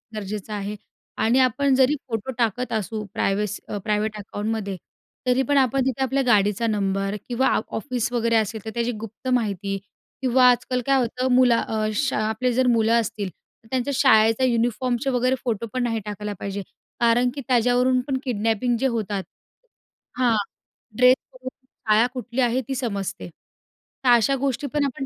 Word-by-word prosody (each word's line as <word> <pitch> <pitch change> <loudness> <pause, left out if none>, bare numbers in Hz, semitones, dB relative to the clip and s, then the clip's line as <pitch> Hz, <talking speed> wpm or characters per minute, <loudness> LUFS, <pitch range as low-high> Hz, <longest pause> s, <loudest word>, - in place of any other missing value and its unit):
गरजेचं 210 0 -5
आहे 205 +1 -4 0.5
आणि 240 +4 +3
आपण 260 +2 +3
जरी 265 +3 +4
फोटो 225 +3 -3
टाकत 235 +1 -1
असू 215 0 -2
प्रायव्हेस 205 +1 -1
अ, 205 - -4
प्रायव्हेट 215 0 -1
अकाउंटमध्ये, 205 -1 -4 0.5
तरी 250 +1 +3
पण 285 - +4
आपण 265 0 +3
तिथे 265 0 -1
आपल्या 270 +1 +1
गाडीचा 210 0 +3
नंबर 195 -1 -1
किंवा 250 +2 +1
आफ 215 - +1
ऑफिस 240 +2 -2
वगैरे 230 -1 +1
असेल 220 0 -1
तर - - -3
त्याची 235 0 -1
गुप्त 225 +4 -9
माहिती 200 -4 -1 0.4
किंवा 255 0 +5
आजकाल 250 +1 +1
काय 275 -1 +3
होतं 250 +2 -1
मुला 245 -2 +5
अ, 215 -1 -1
शा 280 -2 0
आपले 245 +3 0
जर 255 +1 +2
मुलं 230 0 +3
असतील 205 -2 -4
तर 225 - -27
त्यांच्या 260 +2 -1
शाळेचा 225 -2 +4
युनिफॉर्मचे 245 +2 0
वगैरे 255 +1 +2
फोटो 230 -2 -2
पण 255 -1 0
नाही 225 -2 -1
टाकायला 210 0 -5
पाहिजे 200 0 -4 0.4
कारण 240 +1 +3
की 280 - -4
त्याच्यावरून 250 +1 +3
पण 270 - 0
किडनॅपिंग 230 0 0
जे 270 - +2
होतात 210 -5 -2 0.9
हां, 245 -3 +3 0.6
ड्रेसवरुन 255 0 +2 0.2
शाळा 225 -2 +1
कुठली 250 0 -3
आहे 245 +2 +2
ती 270 - -2
समजते. 200 -8 -4 0.8
तर - - +5
अशा 240 +4 +4
गोष्टी 275 +1 -1
पण 290 -1 +2
आपण 270 0 -3
235 Hz, 165 wpm, -23 LUFS, 215-255 Hz, 0.9 s, किंवा